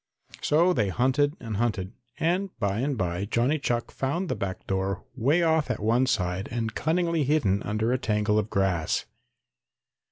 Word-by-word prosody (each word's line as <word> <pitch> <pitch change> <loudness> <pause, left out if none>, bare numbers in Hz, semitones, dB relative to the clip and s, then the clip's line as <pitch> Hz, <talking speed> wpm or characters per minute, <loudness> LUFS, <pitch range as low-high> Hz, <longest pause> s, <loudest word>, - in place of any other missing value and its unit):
So 170 +5 +3
they 105 - +1
hunted 135 - +2
and 110 -4 -4
hunted, 105 -4 -1 0.3
and 180 +4 +1
by 100 -2 0
and 135 +1 -1
by 90 0 -1
Johnny 120 +8 +1
Chuck 120 -3 -1
found 165 +7 -2
the 130 - 0
back 100 -3 -4
door 95 0 -1
way 140 +8 +2
off 160 -3 +2
at 125 - -1
one 120 +5 +2
side 95 -4 0
and 115 -2 -2
cunningly 170 +2 +1
hidden 130 -9 +2
under 110 +3 0
a 130 - 0
tangle 105 -2 +1
of 105 0 -3
grass. 95 -6 0
120 Hz, 165 wpm, -27 LUFS, 100-145 Hz, 0.3 s, So